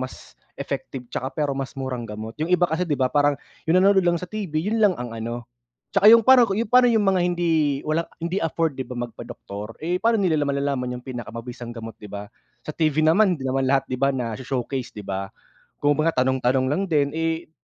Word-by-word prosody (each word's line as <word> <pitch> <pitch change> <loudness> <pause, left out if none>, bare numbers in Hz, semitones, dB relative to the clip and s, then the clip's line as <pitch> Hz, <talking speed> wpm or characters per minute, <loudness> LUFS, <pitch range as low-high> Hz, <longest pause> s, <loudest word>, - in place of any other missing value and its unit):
mas 130 0 -9 0.2
effective 125 -3 -5
'tsaka 130 +1 -4
pero 150 -2 0
mas 135 0 -5
murang 130 -3 -4
gamot. 110 +3 -7
Yung 155 - 0
iba 180 0 +4
kasi 170 +3 0
'di 150 - +1
ba 130 -2 0
parang 145 0 +3 0.3
yung 160 - +2
nanonood 195 -2 +4
lang 175 - +4
sa 180 - -7
TV 205 -7 -5
yun 205 +9 0
lang 205 -4 +4
ang 120 -4 -6
ano, 115 +1 -5 0.5
tsaka 200 0 +3
yung 230 - +5
parang 255 0 +7
ku 195 - -1 0.2
pa'no 250 0 +6
yung 225 -3 +3
mga 195 -2 +2
hindi 160 -5 +1
wala, 160 +2 -1 0.2
hindi 170 +3 -1
afford 165 -4 -1
'di 130 - -3
ba, 125 - -7 0.2
magpadoktor. 105 +1 -8
Eh, 175 +3 0
pa'no 230 +3 +2
nila 155 -5 +2
malalaman 140 -3 -1
yung 125 - -8
pinakamabisang 120 -1 -7
gamot, 115 -1 -8
'di 105 - -10
ba? 100 0 -8 0.3
Sa - - -6
TV 155 -1 +1
naman, 180 +5 +4
hindi 135 - -9
naman 130 0 0
lahat, 135 0 +1
'di 130 - -2
ba 135 0 +2
nasho-showcase, 125 +1 -3
'di 105 - -7
ba? 95 0 -3 0.6
Kumbaga 145 -1 +2
tanong-tanong 130 0 +1
lang 155 +7 0
din. 145 -4 +1
Eh, 165 0 -2
140 Hz, 205 wpm, -23 LUFS, 125-170 Hz, 0.6 s, parang